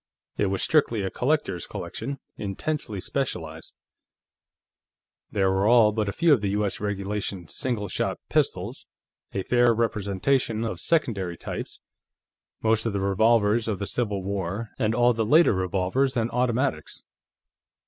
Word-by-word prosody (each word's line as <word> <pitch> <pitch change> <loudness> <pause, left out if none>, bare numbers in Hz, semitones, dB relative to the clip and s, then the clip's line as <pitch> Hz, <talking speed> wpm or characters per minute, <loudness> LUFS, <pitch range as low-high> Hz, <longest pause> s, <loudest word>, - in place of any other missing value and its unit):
It 105 - +1
was 95 0 0
strictly 120 -9 +2
a 95 - -2
collector's 135 - -1
collection, 140 +5 -5 0.2
intensely 105 +2 -3
specialized. 80 - -4 1.5
There 95 -2 +1
were 95 +2 +2
all 115 -2 +6
but 105 -1 -1
a - - -1
few 165 +8 +4
of 125 - +2
the 100 - 0
U.S. 105 -2 -1
regulation 100 -3 -3
single 115 -2 -2
shot 90 - -1
pistols, - - -1 0.4
a 95 - -2
fair 120 +1 +3
representation 110 +2 0
of 115 - -4
secondary 100 - 0
types, - - -6 0.8
most 110 0 +2
of 110 - -2
the 100 - 0
revolvers 110 +3 +3
of 105 -3 -1
the 100 - -3
Civil 105 -4 -2
War, 100 +3 -3
and 110 0 +1
all 120 0 +4
the 115 0 0
later 155 +8 +5
revolvers 95 +8 0
and 115 0 0
automatics. 125 +2 -1
110 Hz, 140 wpm, -25 LUFS, 100-120 Hz, 1.5 s, all